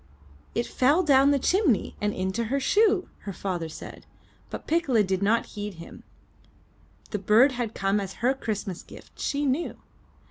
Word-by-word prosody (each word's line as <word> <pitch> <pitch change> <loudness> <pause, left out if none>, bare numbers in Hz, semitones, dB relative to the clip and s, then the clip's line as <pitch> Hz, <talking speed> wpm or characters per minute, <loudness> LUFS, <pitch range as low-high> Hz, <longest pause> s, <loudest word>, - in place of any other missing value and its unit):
"It 235 - 0
fell 290 +8 +2
down 275 -3 +5
the 285 - +4
chimney 330 - +1
and 210 0 +1
into 190 +5 -2
her 275 +5 0
shoe!" 405 +5 +3
her 200 - -6
father 175 -4 -3
said; - - -10 0.4
but - - -7
Piccola 290 -10 +2
did 190 -1 -1
not 220 +4 +2
heed 205 -2 -5
him. 165 +1 -11 1.1
The 210 - -2
bird 220 +8 +5
had 240 -3 -4
come 195 +1 +1
as 195 -1 -5
her 250 +3 +1
Christmas 205 -8 -4
gift, - - -15
she 290 +1 -1
knew. 280 +5 -1
230 Hz, 165 wpm, -26 LUFS, 200-280 Hz, 1.1 s, down